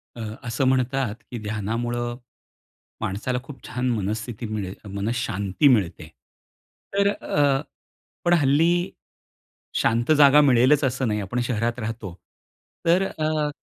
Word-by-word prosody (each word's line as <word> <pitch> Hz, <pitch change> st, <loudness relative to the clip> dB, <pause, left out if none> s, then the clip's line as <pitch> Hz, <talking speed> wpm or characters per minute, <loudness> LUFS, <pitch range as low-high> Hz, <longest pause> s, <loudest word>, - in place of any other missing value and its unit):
अ, -, -, -10 dB, 0.3 s
असं 115 Hz, +4 st, 0 dB
म्हणतात, 130 Hz, -2 st, +1 dB, 0.2 s
की 120 Hz, -, -4 dB
ध्यानामुळं 115 Hz, +3 st, -3 dB, 0.8 s
माणसाला 115 Hz, +6 st, -2 dB
खूप 135 Hz, 0 st, -12 dB
छान 125 Hz, 0 st, -2 dB
मनस्थिती 110 Hz, +2 st, -3 dB
मिळेल 100 Hz, -3 st, -4 dB, 0.2 s
मनःशांती 100 Hz, +1 st, 0 dB
मिळते. 95 Hz, -, +2 dB, 0.9 s
तर 200 Hz, 0 st, +3 dB
अ, 145 Hz, -8 st, +1 dB, 0.6 s
पण 175 Hz, -, +4 dB
हल्ली, 165 Hz, +4 st, +3 dB, 0.9 s
शांत 120 Hz, +5 st, +2 dB
जागा 145 Hz, 0 st, +7 dB
मिळेलच 135 Hz, +2 st, +4 dB
असं 130 Hz, -1 st, 0 dB
नाही 105 Hz, -1 st, 0 dB
आपण 100 Hz, +5 st, -3 dB
शहरात 115 Hz, +1 st, -1 dB
राहतो. 110 Hz, -4 st, -5 dB, 0.7 s
तर 175 Hz, +3 st, +4 dB
अ, 155 Hz, -3 st, -1 dB
120 Hz, 115 wpm, -24 LUFS, 110-140 Hz, 0.9 s, जागा